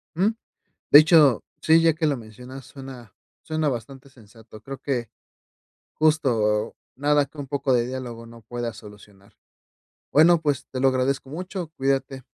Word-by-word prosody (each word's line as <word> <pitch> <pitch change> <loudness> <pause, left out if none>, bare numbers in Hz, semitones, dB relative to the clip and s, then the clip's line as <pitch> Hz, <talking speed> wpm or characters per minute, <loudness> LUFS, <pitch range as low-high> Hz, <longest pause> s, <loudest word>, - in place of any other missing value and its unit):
Ujú. 200 +6 +1 0.6
De 145 - +11
hecho, 155 -6 +5 0.2
sí, 160 +1 +5
ya 165 -1 +4
que 160 +1 -2
lo 145 -2 0
mencionas, 125 +4 -11
suena 130 -6 -11 0.3
suena 155 -1 -1
bastante 135 +2 -7
sensato. 110 -3 -16
Creo 135 +3 -8
que, 120 -6 -3 0.9
justo 115 -9 +1 0.2
nada 145 +1 +2
que 145 - -23
un 140 - -5
poco 140 0 -1
de 120 -1 +1
diálogo 120 -2 -7
no 115 0 -14
pueda 120 +1 -5
solucionar. 105 -2 -16 0.7
Bueno, 165 +3 +5
pues, 145 -4 -1
te 130 - -4
lo 135 - +4
agradezco 130 +1 -1
mucho. 180 +2 -6
Cuídate. 135 -1 -1
135 Hz, 150 wpm, -24 LUFS, 120-150 Hz, 0.9 s, De